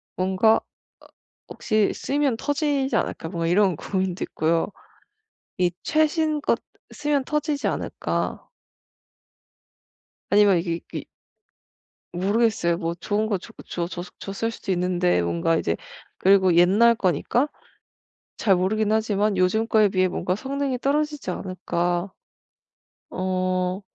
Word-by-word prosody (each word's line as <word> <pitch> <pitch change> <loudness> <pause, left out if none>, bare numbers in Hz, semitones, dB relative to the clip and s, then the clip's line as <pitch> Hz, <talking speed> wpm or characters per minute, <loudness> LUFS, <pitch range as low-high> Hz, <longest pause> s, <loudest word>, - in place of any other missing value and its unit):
뭔가 190 +4 +3 0.9
'혹시 215 -2 +1
쓰면 280 -4 0
터지지 290 -1 0
않을까?' 160 - -2
뭐 170 -2 -3
이런 190 +1 +3
고민도 185 +1 -2
있고요. 165 +1 0 0.9
이 180 -1 +2
최신 310 -1 +1
것 - - +1 0.3
쓰면 295 -2 0
터지지 300 0 -1
않을까? - - -3 1.8
아니면 200 -2 +5
이게 170 0 -2
이게 - - -4 1.1
모르겠어요. 195 -1 +1
뭐 165 +1 -2
좋은 205 +5 -1
거 205 -3 0
줘 - - -13
줬 170 -1 -3
줬을 175 0 -6
줬을 200 +3 -3
수도 195 -4 -4
있는데 175 - +1
뭔가 85 - +1
이제 85 - 0 0.4
그리고 190 -2 +4
옛날 200 +7 +5
거니까 225 - +1 0.9
잘 195 -4 +3
모르긴 210 +4 +1
하지만 210 -2 +1
요즘 185 +5 +2
거에 215 -2 +4
비해 185 -1 +2
뭔가 180 0 -1
성능이 270 +2 -2
떨어지지 295 +2 -1
않을까. 175 -1 -2 1.0
어 185 0 -1
195 Hz, 245 characters per minute, -24 LUFS, 180-235 Hz, 1.8 s, 아니면